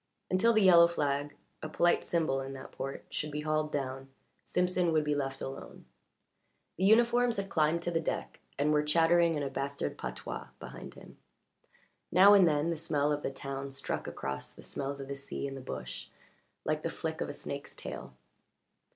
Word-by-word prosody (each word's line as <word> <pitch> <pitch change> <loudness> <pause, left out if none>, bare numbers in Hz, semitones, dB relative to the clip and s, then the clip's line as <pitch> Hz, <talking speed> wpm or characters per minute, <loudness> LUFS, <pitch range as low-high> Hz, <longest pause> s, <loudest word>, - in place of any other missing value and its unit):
Until 185 +6 +4
the 220 -2 +4
yellow 170 -2 +8
flag 145 -3 -1 0.3
a 155 - -5
polite 175 +2 +3
symbol 155 -6 0
in 135 0 -6
that 135 - -9
port 135 0 -6
should 150 - -2
be 150 0 -4
hauled 155 0 0
down 135 -1 -3 0.3
Simpson 180 -1 +1
would 155 -1 +3
be 150 0 0
left 135 -2 -2
alone. 135 +1 -7 0.9
The 185 - +1
uniforms 235 +2 +4
had 195 0 -3
climbed 160 +1 +2
to 175 - -1
the 165 - +1
deck 165 - -3 0.2
and 150 +2 +2
were 150 - +4
chattering 165 +2 +4
in 145 - -1
a 140 - -2
bastard 140 - -3
patois 60 -1 -5
behind - - -9
him; - - -14 0.9
now 195 +4 +8
and 195 -3 +7
then 150 +1 +2
the 165 - -2
smell 150 -2 0
of 145 0 0
the - - -2
town 135 0 -5
struck 135 - -3
across 70 0 -5
the - - -14
smells 140 0 -4
of 135 - -6
the 140 - -4
sea 140 0 -5
and 135 - -6
the 135 - -7
bush 130 - -6 0.6
like - - 0
the - - -2
flick - - -4
of - - -2
a - - -4
snake's - - -7
tail. - - -8
150 Hz, 190 wpm, -31 LUFS, 140-170 Hz, 0.9 s, yellow